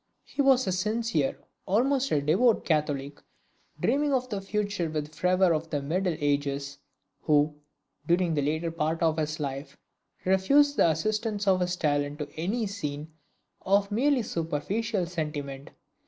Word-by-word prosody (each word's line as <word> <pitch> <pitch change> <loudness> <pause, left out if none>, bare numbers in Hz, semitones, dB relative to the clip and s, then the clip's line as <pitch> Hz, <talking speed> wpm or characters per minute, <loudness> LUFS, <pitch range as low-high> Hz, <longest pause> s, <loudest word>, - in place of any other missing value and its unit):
He - - -2
was 265 -2 +4
a 190 - 0
sincere, 210 -5 0 0.3
almost 265 +7 +2
a 145 - +2
devout 205 +10 +3
Catholic, 145 -3 -1 0.6
dreaming 290 0 +1
of 255 -1 0
the 200 -2 -3
future 200 -3 -2
with 155 -1 -2
the 150 +1 -16
fervor 180 -1 +3
of 160 +1 -2
the 145 - -1
Middle 170 +5 -1
Ages, 140 -1 -1 0.4
who, 150 0 +3 0.5
during 175 -1 +2
the 150 - +1
latter 160 +4 -1
part 165 0 -1
of 160 -1 +2
his 155 0 -2
life, 140 0 -5 0.5
refused 275 +11 +4
the - - +5
assistance 210 +5 -1
of 190 -1 +4
his 180 0 0
talent 145 -3 0
to 150 -1 -4
any 205 +8 -1
scene 155 -6 -5 0.5
of 200 +1 +2
merely 260 +3 +2
superficial 190 +5 -2
sentiment. 150 -5 -5
170 Hz, 150 wpm, -27 LUFS, 150-210 Hz, 0.6 s, the